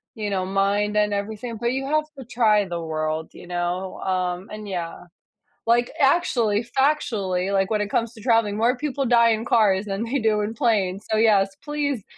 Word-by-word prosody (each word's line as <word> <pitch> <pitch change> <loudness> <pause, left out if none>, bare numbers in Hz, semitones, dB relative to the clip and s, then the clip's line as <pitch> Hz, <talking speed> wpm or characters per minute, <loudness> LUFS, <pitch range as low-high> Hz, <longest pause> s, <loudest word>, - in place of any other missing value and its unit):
you 215 -2 -3
know, 190 -2 -1
mind 200 +2 0
and 210 -1 +2
everything, 220 +3 -4
but 235 +2 -1
you 270 +1 -2
have 305 +2 +1
to 265 - -7
try 220 -3 +3
the 175 -2 -4
world, 155 0 -3
you - - -12
know, 175 +1 -3
um, 185 0 -2
and 210 -1 -7
yeah 175 -3 -5 0.6
like 240 +1 +3
actually, 240 -8 +2
factually, 225 -9 0
like, 195 0 +1
when 215 -1 +1
it 205 - -2
comes 230 +1 -1
to 225 - -13
traveling, 225 -3 +2
more 235 +4 +2
people 285 0 -2
die 235 -2 +4
in 220 0 0
cars 205 -4 +3
than 200 +1 -3
they 250 +4 -1
do 220 -2 +1
in 210 +2 -2
planes, 210 -5 0
so, 220 - +2
yes, 200 -3 +3
please 285 -6 -2
210 Hz, 190 wpm, -23 LUFS, 195-235 Hz, 0.6 s, die